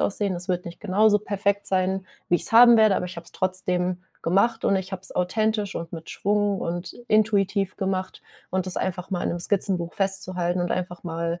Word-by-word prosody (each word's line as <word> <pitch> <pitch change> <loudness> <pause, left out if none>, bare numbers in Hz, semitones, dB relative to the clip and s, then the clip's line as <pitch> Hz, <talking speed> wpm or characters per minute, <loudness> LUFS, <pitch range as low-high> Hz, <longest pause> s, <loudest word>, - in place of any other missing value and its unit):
aussehen. 200 -2 0
Es 175 +1 -7
wird 180 -1 -1
nicht 170 - -8
genauso 210 +1 +3
perfekt 200 0 -1
sein, 190 0 0 0.2
wie 175 - +4
ich's - - -3
haben 235 +1 +9
werde, 215 -2 +5
aber 180 - -2
ich 175 - -9
habe 170 - -8
es - - -7
trotzdem 180 -1 -1 0.2
gemacht 210 +7 +2
und 195 - +3
ich 190 0 -4
habe 185 -1 -5
es - - -4
authentisch 210 +3 0
und 165 0 -6
mit 165 -1 -8
Schwung 205 -1 0
und 175 +1 -4 0.2
intuitiv 205 -2 +2
gemacht”, 190 -1 -3 0.3
und 185 0 -1
das 185 - -3
einfach 180 0 -3
mal 180 -2 -1
in - - 0
'nem 175 - -3
Skizzenbuch 180 -2 0
festzuhalten 185 -2 0
und 175 - -1
einfach 180 -1 -4
mal 170 0 -3
185 Hz, 205 wpm, -24 LUFS, 180-200 Hz, 0.3 s, haben